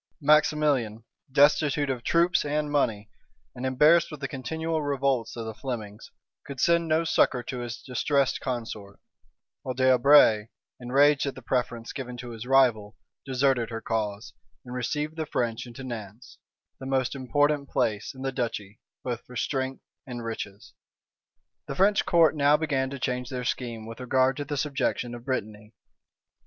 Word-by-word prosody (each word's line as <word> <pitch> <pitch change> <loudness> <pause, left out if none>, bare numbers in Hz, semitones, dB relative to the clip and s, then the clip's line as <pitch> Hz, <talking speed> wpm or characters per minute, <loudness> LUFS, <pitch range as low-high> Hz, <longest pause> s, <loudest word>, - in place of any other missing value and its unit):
Maximilian, 145 -7 +2 0.3
destitute 145 0 +3
of 125 -2 -4
troops 170 +5 +3
and 150 0 -1
money, 110 -8 0 0.5
and 130 +1 -4
embarrassed 155 +6 +4
with 155 - -8
the 140 - -3
continual 160 +5 -3
revolts 135 -4 0
of 115 -1 -5
the 110 - -5
Flemings, 110 -3 -6 0.3
could 140 -2 -8
send 170 +3 +3
no 160 +1 +2
succor 130 -6 +2
to 125 +1 -5
his 120 -1 -6
distressed 140 +1 0
consort; 115 -6 -5 0.6
while 130 - -4
D'Albret, 130 -4 +5 0.3
enraged 140 +4 +3
at 135 - -3
the 130 - -11
preference 120 -2 -2
given 125 -3 -6
to 120 0 -7
his 115 +1 -8
rival, 120 -6 +3 0.3
deserted 130 -2 +1
her 115 -1 -4
cause, 110 -2 -3 0.3
and 125 - -8
received 150 +5 -3
the 160 -1 -3
French 120 -2 -2
into 120 +2 -9
Nantz, 115 -2 -8 0.4
the 130 - -7
most 130 -2 0
important 140 +2 0
place 105 +3 -1
in 130 - -8
the 135 - -1
duchy 115 -5 -4 0.2
both 120 -2 -3
for 125 - -12
strength 130 +1 -2 0.2
and 120 -2 -6
riches. 105 -3 -7 0.9
The - - -4
French 200 +2 +3
court 165 -3 +5
now 145 0 +4
began 135 -4 -1
to 140 - -6
change 125 -1 -2
their 125 -1 -4
scheme 115 -3 -3
with 115 +1 -9
regard 130 +1 +2
to 145 - -3
the 145 0 -4
subjection 135 -3 -1
of 120 0 -9
Brittany. 110 -4 -4
130 Hz, 160 wpm, -27 LUFS, 115-145 Hz, 0.9 s, D'Albret